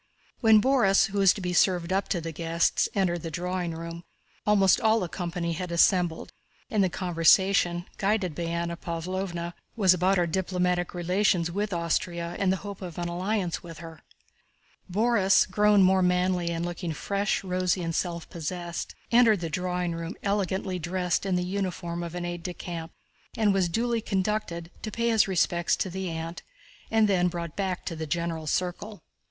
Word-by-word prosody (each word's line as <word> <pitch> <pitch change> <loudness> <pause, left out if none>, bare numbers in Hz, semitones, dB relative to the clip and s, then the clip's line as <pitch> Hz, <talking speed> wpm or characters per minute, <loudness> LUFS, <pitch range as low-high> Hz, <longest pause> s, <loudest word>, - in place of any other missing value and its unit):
When 220 -2 +6
Borís, 230 -6 +3
who 200 - -1
was 195 -2 +6
to 200 - -7
be 180 -1 -2
served 180 -1 +2
up 195 +1 0
to 175 - 0
the 165 0 -5
guests, 165 +1 +1
entered 175 -4 +1
the 165 - -5
drawing 175 +1 -3
room, 170 +1 -7 0.4
almost 200 -1 +4
all 220 0 +4
the 180 - -2
company 170 -1 -3
had 180 +1 -5
assembled, 170 -1 +2 0.4
and 210 -3 +3
the 185 - +2
conversation, 175 0 +3
guided 195 -4 +1
by 170 +3 -4
Anna 170 0 -2
Pávlovna, 170 +1 -4 0.2
was 195 -5 +5
about 185 +2 +2
our 175 - +3
diplomatic 180 0 -1
relations 180 0 +1
with 205 +3 -2
Austria 170 0 -2
and 195 -2 +2
the 190 - +1
hope 200 -1 -7
of 175 -3 -7
an 175 0 -2
alliance 180 0 -1
with 165 -2 -10
her. 165 -1 -10 0.9
Borís, 205 -1 +3
grown 205 +1 +4
more 190 0 +4
manly 180 -1 +1
and 170 0 -2
looking 175 -1 -4
fresh, 200 +5 -1
rosy 185 -1 0
and 165 0 -2
self 170 -1 -2
possessed, 170 +1 -5 0.2
entered 230 -4 +5
the 165 -2 -3
drawing 180 +1 -1
room 165 +2 -5
elegantly 190 -2 -1
dressed 180 +2 -1
in 190 - +1
the 180 - 0
uniform 180 -2 -3
of 170 0 -6
an 175 0 -3
aide 175 0 -4
de 180 0 -5
camp 165 -2 -6 0.5
and 210 -3 +3
was 190 -3 +1
duly 230 +5 0
conducted 190 -4 -2
to 215 - -4
pay 235 +2 -1
his 220 -3 +4
respects 175 -2 +1
to 185 - -3
the 190 0 -3
aunt 165 +1 -5 0.5
and 220 -1 +4
then 180 -3 +3
brought 170 -2 -5
back 190 -3 -2
to 165 - -4
the 160 0 -5
general 165 0 -2
circle. 185 +6 -3
180 Hz, 180 wpm, -27 LUFS, 170-195 Hz, 0.9 s, When